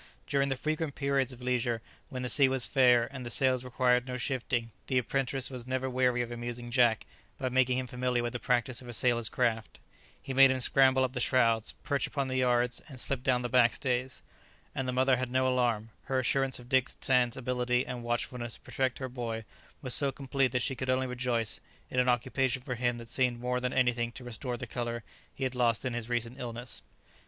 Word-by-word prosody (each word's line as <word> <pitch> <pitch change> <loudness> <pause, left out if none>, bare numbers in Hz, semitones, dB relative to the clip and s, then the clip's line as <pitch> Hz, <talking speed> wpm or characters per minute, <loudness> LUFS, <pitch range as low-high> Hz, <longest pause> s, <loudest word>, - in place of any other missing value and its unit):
During 140 0 +1
the 135 - 0
frequent 155 +2 -2
periods 140 -2 0
of 125 -1 -11
leisure, 120 -2 0 0.3
when 130 -3 -5
the - - -2
sea 135 +2 +5
was 130 -2 +2
fair, 125 -3 +4
and 130 -2 -6
the 120 - -5
sails 130 +1 +2
required 125 0 +1
no 125 0 -3
shifting, 120 -2 -2 0.2
the 130 - +1
apprentice 135 +1 -1
was 125 -2 -7
never 130 0 -1
weary 125 -1 +2
of 120 - -7
amusing 120 0 -5
Jack 120 -3 +3 0.3
by 130 - -2
making 130 0 +2
him 130 - -2
familiar 125 0 -1
with 120 0 -3
the 125 - -3
practice 125 +1 0
of 125 - -12
a 120 - -6
sailor's 120 -1 +3
craft; 115 -3 -1 0.4
he 135 - -6
made 135 0 +7
him 130 0 0
scramble 130 +1 +5
up 130 -1 -1
the 125 - -2
shrouds, 115 -3 +2
perch 140 -1 0
upon 140 -3 -2
the 130 - -1
yards, 125 -1 +2
and 130 -3 -10
slip 135 0 -2
down 125 -1 +1
the - - 0
back 120 -1 +4
stays; 130 -1 -2 0.5
and 135 -1 -3
the - - 0
mother 130 0 +3
had 130 0 -2
no 130 +1 +2
alarm; 120 -4 0
her 135 - -1
assurance 130 +1 +1
of 120 - -12
Dick 130 0 +2
Sands' 125 -2 +2
ability 125 0 0
and 125 -1 -5
watchfulness 120 0 -3
to - - -16
protect 130 -2 -1
her 130 - -4
boy 115 -3 -5 0.4
was 130 - +1
so 140 -1 +3
complete 135 -1 0
that 125 -1 0
she 135 - 0
could 130 +1 -4
only 130 0 +2
rejoice 125 -3 -1 0.3
in 125 - 0
an 125 0 +3
occupation 125 +1 0
for 125 - -3
him 120 0 0
that 115 -1 -9
seemed 120 0 +1
more 125 +1 -1
than 125 0 -2
anything 120 -2 +1
to 125 - -9
restore 120 +1 -4
the 125 - -5
colour 120 0 -4 0.3
he 135 - -7
had 130 -1 -1
lost 120 -2 +1
in 130 - -1
his 120 -1 -4
recent 120 0 -2
illness. 120 -1 -5
125 Hz, 220 wpm, -30 LUFS, 120-130 Hz, 0.5 s, made